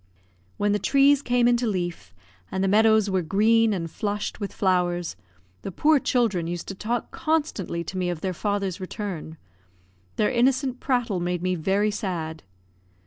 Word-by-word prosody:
When 205 0 +1
the 205 - +1
trees 275 +6 +4
came 245 -2 +2
into 240 0 +2
leaf, 175 - -3 0.4
and 190 - -1
the - - +2
meadows 220 +1 +4
were 190 -2 +1
green 220 +6 +3
and 180 -5 -2
flushed 205 +3 -3
with 200 -2 -4
flowers, 175 - 0 0.5
the 195 - -5
poor 300 - +3
children 220 -11 +1
used 175 0 -5
to - - -4
talk 225 +5 -3
constantly 295 - -1
to 185 +3 -5
me 180 -1 0
of 170 -3 -4
their 190 -1 -2
father's 200 -2 -2
return; 185 -4 -6 0.8
their 210 - +1
innocent 260 +1 +1
prattle 245 -8 0
made 175 0 -2
me 185 0 +1
very 195 +5 +1
sad. 170 -7 -4
200 Hz, 160 wpm, -25 LUFS, 180-235 Hz, 0.8 s, trees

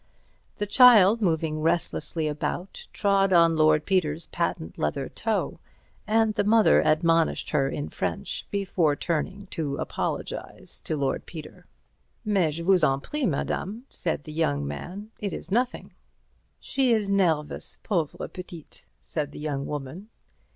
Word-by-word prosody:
The 205 - -1
child, 225 -1 +7
moving 160 -4 0
restlessly 160 -1 0
about, 155 +5 -4
trod 195 -2 +2
on 170 -2 +5
Lord 155 -1 +4
Peter's 170 -4 0
patent 125 - -3
leather 75 - -1
toe, - - -2 0.5
and 220 0 +3
the 205 -1 +1
mother 220 +1 +5
admonished 165 +1 +2
her 135 -3 +2
in 145 - -4
French 90 -3 -3
before 185 -6 +1
turning 185 +6 -2
to 145 -5 -2
apologize - - -4
to 155 - -2
Lord 140 -2 -1
Peter. 155 -3 -10 0.6
"Mais 185 -8 +1
je 170 - -4
vous 185 0 +4
en 135 0 +3
prie, 290 - -2
madame," 200 - -2
said 165 -4 -2
the 155 - -9
young 70 - 0
man, 185 - -7
"it 200 -3 -3
is 175 - -7
nothing." 245 +4 -1 0.7
"She 265 -2 0
is 215 -3 +2
nervous, 165 -7 0
pauvre 170 -8 -1
petite," 175 -3 -11 0.2
said 150 -3 -2
the - - -9
young 145 -2 -3
woman. 150 +8 -6
170 Hz, 140 wpm, -26 LUFS, 150-200 Hz, 0.7 s, child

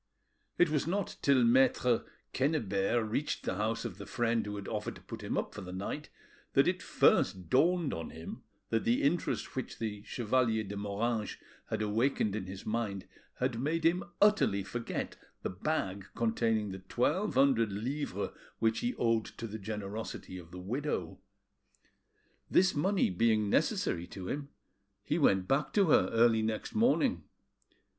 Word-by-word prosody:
It 175 - +5
was 150 0 +1
not 195 +2 -1
till 135 -3 +4
Maitre 125 0 +4 0.3
Quennebert 115 -6 +1
reached 135 +7 -2
the 95 - -2
house 110 +3 -1
of 105 -4 -6
the 100 - -8
friend 120 -1 +1
who 105 - -4
had 100 -1 -6
offered 105 -1 -3
to - - -13
put - - -8
him - - -2
up - - -2
for - - -7
the 90 -1 -7
night 95 +2 -4 0.4
that - - +5
it - - +1
first 90 -3 +2
dawned 170 +3 +3
on 80 0 -4
him, 80 +1 -8 0.3
that 115 -1 +1
the 120 - +2
interest 165 +5 0
which 130 - -4
the 105 -3 -4
Chevalier 115 0 +1
de 100 0 -6
Moranges 105 +2 -2 0.3
had - - -1
awakened 110 0 +1
in 100 -4 -4
his 95 0 -8
mind 110 -4 -2 0.3
had 125 -2 -1
made 160 +5 0
him 175 +3 +3 0.2
utterly 205 - +4
forget 115 +4 -4 0.3
the - - -2
bag 100 - -2
containing 115 -2 +1
the 95 - -6
twelve 145 - 0
hundred 130 -5 +4
livres 130 +9 -3 0.3
which 110 0 +1
he 245 +1 -1
owed 115 -2 +2
to 115 - -8
the 110 0 -6
generosity 105 -2 -5
of 85 -2 -12
the 90 - -10
widow. 100 - -3 1.3
This 185 0 +4
money 185 - +2
being 105 +1 +2
necessary 85 +1 +1
to 95 -2 -7
him, 140 0 -3 0.5
he 160 - 0
went 95 - +3
back 140 +3 +1
to 195 -6 +4
her - - +5
early 115 -1 +4
next 110 0 -2
morning. 240 +3 +2
115 Hz, 165 wpm, -32 LUFS, 100-140 Hz, 1.3 s, It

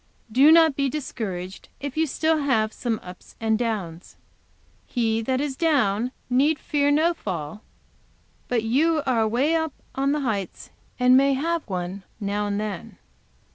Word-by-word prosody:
Do 270 +7 +6
not 320 -3 +6
be 275 -1 0
discouraged 195 -10 -5
if 280 -1 -5
you 320 0 +1
still 315 +3 +1
have 225 -7 +1
some 230 -3 -2
ups 180 0 -12
and 220 -1 +1
downs. 205 -8 -4 0.7
'He 225 -2 0
that 255 +3 -1
is 285 -1 -2
down 250 -8 +1 0.2
need 280 +5 +2
fear 285 -1 0
no 315 +4 +3
fall'; 180 - -5 0.9
but 235 -3 0
you 305 +7 +2
are 250 -4 +2
away 245 +8 +1
up 320 -3 0 0.2
on 275 +1 0
the 295 0 0
heights, 210 -8 -3 0.3
and 250 0 +6
may 275 +1 +5
have 335 +4 -1
one, 185 +1 -4 0.2
now 205 0 -1
and 200 0 -1
then." 210 -4 -5
250 Hz, 155 wpm, -24 LUFS, 210-290 Hz, 0.9 s, Do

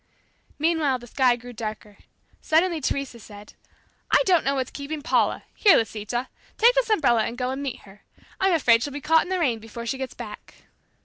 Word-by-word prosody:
Meanwhile 310 -4 +1
the 240 - -13
sky 250 +1 +2
grew 245 +1 -11
darker. 215 -2 -7 0.4
Suddenly 330 0 +2
Teresa 270 -3 -3
said, 205 -1 -13 0.6
"I - - +4
don't 355 -4 +3
know 275 +1 0
what's 260 -2 -2
keeping 290 +1 -6
Paula, 330 - +1
Here, 410 - +5
Lisita! 225 +3 -2 0.3
Take 470 +3 +6
this - - +1
umbrella 240 - +3
and 235 - -5
go 250 0 -2
and 265 +1 -4
meet 275 -3 -5
her. 200 +1 -17 0.4
I'm 385 -1 +3
afraid 235 -8 +4
she'll 285 +2 -4
be 290 - -4
caught 320 +3 +3
in - - -6
the 375 - 0
rain 255 -10 0
before 225 +1 -9
she 265 +3 -3
gets 265 -2 -5
back." 225 -4 -10
265 Hz, 195 wpm, -24 LUFS, 230-320 Hz, 0.6 s, Take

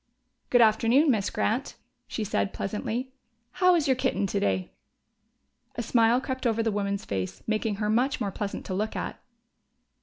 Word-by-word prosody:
"Good 245 - +5
afternoon, 230 +7 +4
Miss 205 -5 0
Grant," 245 +6 -1 0.3
she 220 - -3
said 200 -1 -1
pleasantly. 225 +6 -3 0.4
"How 365 +3 +4
is 320 -4 +1
your 270 - +4
kitten 255 -5 0
today?" 95 - -1 1.0
A 235 - -2
smile 230 +1 +3
crept 260 -1 -2
over 225 0 +1
the 225 - +1
woman's 200 -1 -2
face, 95 -1 -4
making 215 -1 0
her 210 +1 -2
much 250 +7 +1
more 200 - -2
pleasant 200 +1 -4
to 190 - -4
look 215 +3 -2
at. - - -4
220 Hz, 160 wpm, -27 LUFS, 200-250 Hz, 1.0 s, Good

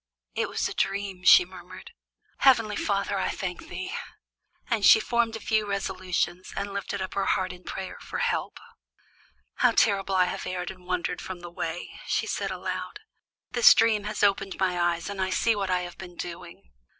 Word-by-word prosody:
"It - - -1
was - - -1
a - - -5
dream," 195 -2 -2
she 180 - +9
murmured. 180 -1 -12 0.5
"Heavenly 230 -6 +4
Father, 200 -1 -1
I - - 0
thank 185 - -5
thee!" 375 +5 -5 0.7
And 230 -4 0
she 220 - +8
formed 235 0 0
a - - -5
few 215 0 0
resolutions 185 -2 -2
and 200 0 -3
lifted 200 0 -3
up 185 - -6
her 200 - -1
heart 185 -1 +1
in 180 0 -14
prayer 190 -1 -6
for - - -6
help. - - -1 1.0
"How - - +4
terribly 195 -1 +2
I 185 -1 +5
have 180 - -4
erred 180 0 -3
and 185 -1 -15
wandered 180 -1 -2
from 185 -2 -7
the 175 0 -9
way," 175 -1 -5
she - - 0
said - - -2
aloud. - - -5 0.5
"This 485 0 +7
dream 220 -2 +3
has 210 0 -3
opened 195 -1 +2
my 180 -2 +1
eyes, 170 -1 0
and 200 -1 -4
I 190 - 0
see 225 +4 +2
what 195 -2 -2
I 180 -1 +1
have 175 -1 -8
been 180 -2 -9
doing. 170 - -8
190 Hz, 185 wpm, -27 LUFS, 180-205 Hz, 1.0 s, she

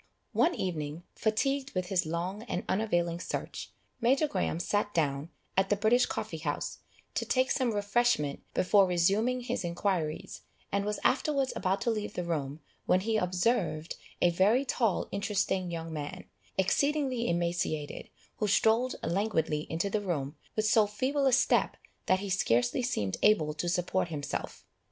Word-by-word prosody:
One 345 +2 +3
evening, 160 -2 -3
fatigued 270 +5 0
with 185 -1 -1
his 185 -4 +1
long 175 +5 -3
and 180 - -2
unavailing 175 -4 0
search, - - -5 0.3
Major 265 +6 +3
Graham 225 - -1
sat 205 +3 -1
down, 145 -1 0 0.3
at 195 +1 +2
the 205 - +4
British 225 +5 +3
Coffee 160 - -4
house, 150 -2 -3 0.3
to - - -1
take 260 0 +1
some 255 -4 +1
refreshment 205 -7 +1
before 195 +1 +5
resuming 200 +8 +2
his 245 -3 -3
inquiries, 170 -2 -2 0.3
and 200 0 0
was 210 0 -2
afterwards 275 -1 +2
about 190 +1 0
to 235 - +1
leave 215 -2 -3
the 180 - -2
room, 155 -3 -3 0.3
when 185 - +4
he 220 +3 0
observed 180 -4 0 0.3
a 175 - +5
very 210 +10 +3
tall 230 -6 +1
interesting 195 -2 0
young 165 -1 -5
man, 145 -2 -5 0.3
exceedingly 260 +4 +1
emaciated, 170 -3 -2 0.3
who 210 - 0
strolled 225 +5 +3
languidly 165 -5 0
into 165 +4 -1
the 205 +1 -1
room, 155 -7 -2 0.2
with 215 - +1
so 215 -1 +5
feeble 270 +7 0
a - - +4
step, 255 - +3 0.3
that 185 0 +3
he 200 - -4
scarcely 120 - +2
seemed 105 - -1
able 160 -8 +4
to 155 +3 -2
support 180 +1 0
himself. 145 -4 -5
190 Hz, 155 wpm, -30 LUFS, 170-225 Hz, 0.3 s, before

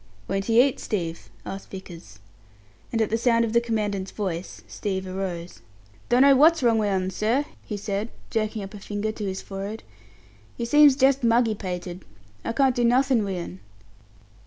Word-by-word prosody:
"Won't 195 +1 -1
he 230 +2 +6
eat, 275 - -5
Steve?" 170 -6 -4 0.2
asked 195 - -7
Vickers. 170 - -10 0.7
And 225 -1 +2
at 215 - -3
the 225 - +1
sound 230 -1 +3
of 225 - -4
the 235 - +4
Commandant's 210 -4 -2
voice, 185 -4 -5
Steve 190 -2 -3
arose. 185 -2 -5 0.5
"Dunno 270 +3 +6
what's 315 +2 +5
wrong 230 -2 +4
wi' 210 -1 +1
'un, 190 -1 0
sir," 235 +9 +1 0.2
he 210 - -5
said, 205 +2 -3 0.2
jerking 215 -1 -1
up 195 +2 -9
a 205 - -8
finger 205 +2 -3
to 215 -1 -6
his 190 0 -4
forehead. 200 +3 -6 0.7
"He 235 - -2
seems 295 +2 +6
jest 270 0 +3
muggy 230 -1 +3
pated. 180 -2 -6 0.4
I - - -2
can't 265 +2 +3
do 245 - +1
nothin' 250 0 +3
wi' 195 -2 -3
'un." 95 - -7
215 Hz, 175 wpm, -25 LUFS, 190-235 Hz, 0.7 s, he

